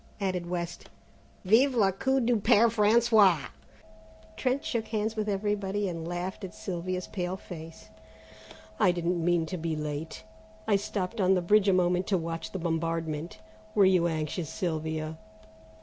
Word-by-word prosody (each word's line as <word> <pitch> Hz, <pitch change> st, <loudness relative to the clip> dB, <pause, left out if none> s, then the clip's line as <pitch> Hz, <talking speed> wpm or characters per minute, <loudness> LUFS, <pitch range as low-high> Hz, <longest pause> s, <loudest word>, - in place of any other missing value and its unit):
added 185 Hz, -3 st, -2 dB
West; 175 Hz, -1 st, -4 dB, 0.6 s
"vive 250 Hz, +7 st, +4 dB
le 200 Hz, -4 st, +4 dB
coup 265 Hz, +8 st, +1 dB
du 240 Hz, -1 st, +2 dB
Père 220 Hz, +2 st, +4 dB
François!" 210 Hz, -6 st, +4 dB, 0.9 s
Trent 265 Hz, +3 st, -1 dB
shook 225 Hz, -2 st, -2 dB
hands 220 Hz, 0 st, -2 dB
with 215 Hz, -1 st, -2 dB
everybody 205 Hz, 0 st, -1 dB
and 165 Hz, -2 st, -5 dB
laughed 175 Hz, +4 st, -4 dB
at 190 Hz, -, -7 dB
Sylvia's 185 Hz, 0 st, -4 dB
pale 180 Hz, -1 st, -4 dB
face. 165 Hz, -3 st, -10 dB, 0.9 s
"I 190 Hz, -4 st, +5 dB
didn't 175 Hz, -1 st, -1 dB
mean 175 Hz, -1 st, +2 dB
to 180 Hz, +3 st, -5 dB
be 160 Hz, 0 st, -2 dB
late; 150 Hz, +1 st, -5 dB, 0.4 s
I 210 Hz, -, +4 dB
stopped 200 Hz, +2 st, -2 dB
on 190 Hz, 0 st, +4 dB
the 180 Hz, -, +1 dB
bridge 205 Hz, +2 st, +4 dB
a -, -, +5 dB
moment 180 Hz, 0 st, +2 dB
to 195 Hz, -, +2 dB
watch 165 Hz, -1 st, -5 dB
the -, -, -4 dB
bombardment. 165 Hz, -3 st, -2 dB, 0.4 s
Were 205 Hz, -2 st, +6 dB
you 180 Hz, -2 st, +4 dB
anxious, 155 Hz, 0 st, -3 dB
Sylvia?" 160 Hz, -3 st, -3 dB
185 Hz, 150 wpm, -28 LUFS, 165-210 Hz, 0.9 s, Were